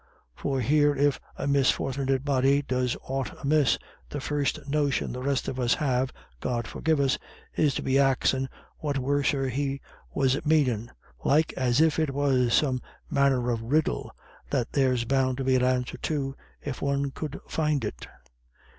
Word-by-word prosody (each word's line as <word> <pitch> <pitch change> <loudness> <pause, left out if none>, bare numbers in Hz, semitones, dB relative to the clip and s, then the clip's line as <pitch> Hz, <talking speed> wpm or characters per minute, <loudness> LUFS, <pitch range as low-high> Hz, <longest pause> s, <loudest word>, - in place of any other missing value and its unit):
For 135 - -2
here 145 +4 +3
if 145 0 +2 0.2
a - - -3
misfort'nit 135 -1 +1
body 140 0 +3
does 125 -2 -1
aught 135 -1 -4
amiss, 145 -1 +3 0.3
the 145 - -4
first 145 0 -2
notion 145 -1 0
the 125 - -5
rest 140 0 0
of 130 - -3
us 120 -1 +3
have, 130 -3 0 0.3
God 120 - -2
forgive 160 +6 0
us, 135 -2 +2 0.4
is 150 -3 +2
to - - -2
be 135 +1 +2
axin' 135 -1 +2 0.3
what 145 -2 -1
worser 140 0 +1
he 135 +2 -2 0.3
was 135 +1 +1
manin', 130 -8 +2 0.3
like 155 +3 +3
as 125 +1 +2
if 160 0 +3
it 150 -4 0
was 130 -4 +2
some 130 -4 +2 0.3
manner 130 -3 +2
of 115 -1 -1
riddle, 150 +7 0 0.4
that 125 -4 -1
there's 130 -4 +2
bound 130 0 +1
to 135 - -2
be 130 0 +3
an 125 - +2
answer 125 -1 0
to, 140 -3 -2 0.3
if 140 -3 -5
one 140 0 0
could 150 0 -5
find 150 -6 0
it." 65 -12 -6
135 Hz, 165 wpm, -27 LUFS, 130-145 Hz, 0.4 s, here